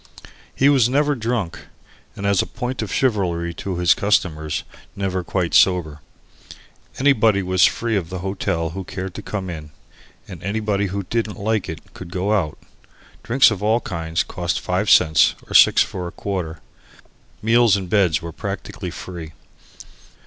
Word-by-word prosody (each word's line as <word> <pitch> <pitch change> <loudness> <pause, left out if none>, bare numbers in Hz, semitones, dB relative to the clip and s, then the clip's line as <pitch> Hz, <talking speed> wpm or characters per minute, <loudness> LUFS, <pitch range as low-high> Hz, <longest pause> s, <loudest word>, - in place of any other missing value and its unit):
He 135 - +3
was 135 -5 +4
never 145 +3 +2
drunk, 115 -7 -2 0.6
and, 100 - -6
as 100 -2 +3
a - - -4
point 125 +1 -4
of 105 -3 -4
chivalry 90 -9 0
to 95 +2 -5
his 90 0 +4
customers, 80 -7 0 0.3
never 95 -2 -2
quite 90 -1 -2
sober. 80 -5 +3 1.0
Anybody 115 -7 +3
was 95 -1 +4
free 115 -1 0
of 90 -5 -2
the 95 - -5
hotel 85 -4 -2
who 95 +3 -5
cared 95 +1 -6
to - - -7
come 100 -3 -5
in. 80 -4 -7 0.6
Anybody 100 0 -2
who 100 +1 -3
didn't 110 +3 -2
like 110 0 -1
it 80 - -9
could 90 - -9
go 95 +4 0
out. 85 -8 0 0.6
Drinks 130 +1 +4
of 105 -3 -4
all 110 +3 +2
kinds 80 -6 -2
cost - - -3
five 95 +4 -1
cents, 80 -3 +5
or - - -8
six - - +7
for 90 -1 -6
a - - -7
quarter. 85 -6 -4 0.8
Meals 115 -1 +4
and 95 -2 -5
beds 90 -6 +2
were 85 - -5
practically - - -6
free. 85 -4 -8
95 Hz, 155 wpm, -21 LUFS, 85-110 Hz, 1.0 s, six